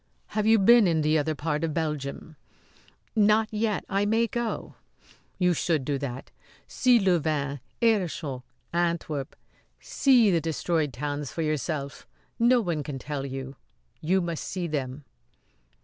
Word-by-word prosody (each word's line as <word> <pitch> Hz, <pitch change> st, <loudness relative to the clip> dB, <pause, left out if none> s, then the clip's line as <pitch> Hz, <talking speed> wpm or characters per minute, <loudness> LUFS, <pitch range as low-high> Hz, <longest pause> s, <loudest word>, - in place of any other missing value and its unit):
Have 215 Hz, 0 st, -1 dB
you 225 Hz, 0 st, +6 dB
been 225 Hz, +1 st, +6 dB
in 160 Hz, -2 st, +2 dB
the 155 Hz, +1 st, +3 dB
other 155 Hz, +1 st, -1 dB
part 150 Hz, +1 st, -2 dB
of 160 Hz, -2 st, -2 dB
Belgium?" 150 Hz, -1 st, -3 dB, 0.8 s
"Not 215 Hz, +1 st, +4 dB
yet; 215 Hz, -1 st, -1 dB
I 195 Hz, +1 st, 0 dB
may 225 Hz, +3 st, +2 dB
go." 235 Hz, 0 st, -3 dB, 0.6 s
"You 180 Hz, -2 st, +3 dB
should 160 Hz, -4 st, 0 dB
do 140 Hz, -1 st, -1 dB
that 130 Hz, -2 st, -6 dB, 0.4 s
see 250 Hz, -1 st, +4 dB
Louvain, 155 Hz, -8 st, 0 dB, 0.2 s
Aerschot, 165 Hz, -, 0 dB, 0.3 s
Antwerp 170 Hz, -5 st, -1 dB, 0.4 s
see 245 Hz, -7 st, +4 dB
the 170 Hz, -2 st, +2 dB
destroyed 160 Hz, -1 st, -1 dB
towns 145 Hz, +3 st, -4 dB
for 165 Hz, -, -3 dB
yourself. 150 Hz, -1 st, -3 dB, 0.3 s
No 240 Hz, +1 st, +5 dB
one 170 Hz, -7 st, -2 dB
can 140 Hz, -1 st, -5 dB
tell 140 Hz, +1 st, -4 dB
you. 135 Hz, 0 st, -6 dB, 0.4 s
You 185 Hz, +4 st, +2 dB
must 170 Hz, -2 st, -3 dB
see 180 Hz, -2 st, -4 dB
them." 140 Hz, -3 st, -4 dB
160 Hz, 140 wpm, -27 LUFS, 145-200 Hz, 0.8 s, you